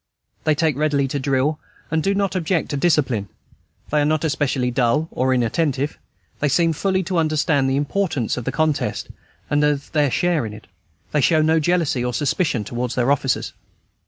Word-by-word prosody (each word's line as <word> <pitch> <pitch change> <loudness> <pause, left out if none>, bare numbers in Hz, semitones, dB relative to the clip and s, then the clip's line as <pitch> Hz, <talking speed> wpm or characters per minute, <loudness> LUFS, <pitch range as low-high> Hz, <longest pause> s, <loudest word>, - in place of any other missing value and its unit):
They 155 - +3
take 155 -2 +1
readily 145 -2 +1
to 145 - -2
drill, 140 +3 0 0.3
and 160 0 +1
do 195 +4 +1
not 200 -1 0
object 175 -1 0
to - - -2
discipline; 135 - +1 0.6
they 150 0 +3
are - - +2
not 155 +1 +1
especially 135 -4 0
dull 125 +5 +1
or 130 +1 0
inattentive; 135 +3 0 0.4
they 145 - +1
seem 165 +4 +2
fully 190 +3 0
to 180 -1 -1
understand 155 -3 +1
the 135 - +1
importance 145 - -1
of 125 - -5
the - - -1
contest, 155 -2 -1 0.4
and 145 0 +1
of 145 -2 0
their 150 -3 +2
share 175 +1 +1
in 105 - -8
it. 105 - -12 0.5
They 150 - +2
show 155 +3 +3
no 160 +1 +3
jealousy 160 -6 +1
or 125 -1 -2
suspicion 140 - 0
towards 120 +3 -3
their 125 +2 +2
officers. 135 -2 0
145 Hz, 185 wpm, -21 LUFS, 130-160 Hz, 0.6 s, They